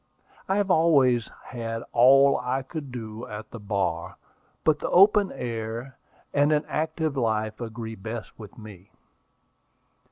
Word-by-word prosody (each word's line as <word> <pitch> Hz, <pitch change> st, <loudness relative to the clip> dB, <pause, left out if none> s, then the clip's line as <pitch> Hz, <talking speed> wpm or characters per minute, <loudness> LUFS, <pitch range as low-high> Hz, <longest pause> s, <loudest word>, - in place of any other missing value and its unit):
"I 195 Hz, -, +2 dB
have 200 Hz, -2 st, +1 dB
always 135 Hz, -9 st, +3 dB, 0.2 s
had 115 Hz, -2 st, -5 dB
all 135 Hz, +3 st, +6 dB
I 125 Hz, +2 st, -2 dB
could 145 Hz, -1 st, -7 dB
do 115 Hz, -1 st, -7 dB
at 105 Hz, +1 st, -8 dB
the 115 Hz, -, -8 dB
bar; 100 Hz, -5 st, -2 dB, 0.5 s
but 155 Hz, -1 st, +3 dB
the -, -, -3 dB
open 205 Hz, +2 st, +5 dB
air 115 Hz, +2 st, -5 dB, 0.4 s
and 145 Hz, +1 st, +3 dB
an 150 Hz, 0 st, +1 dB
active 155 Hz, -1 st, -2 dB
life 110 Hz, -3 st, -1 dB
agree 115 Hz, -1 st, -6 dB
best 110 Hz, +3 st, -8 dB
with 105 Hz, -3 st, -11 dB
me." 105 Hz, -4 st, -12 dB
120 Hz, 135 wpm, -26 LUFS, 110-145 Hz, 0.5 s, all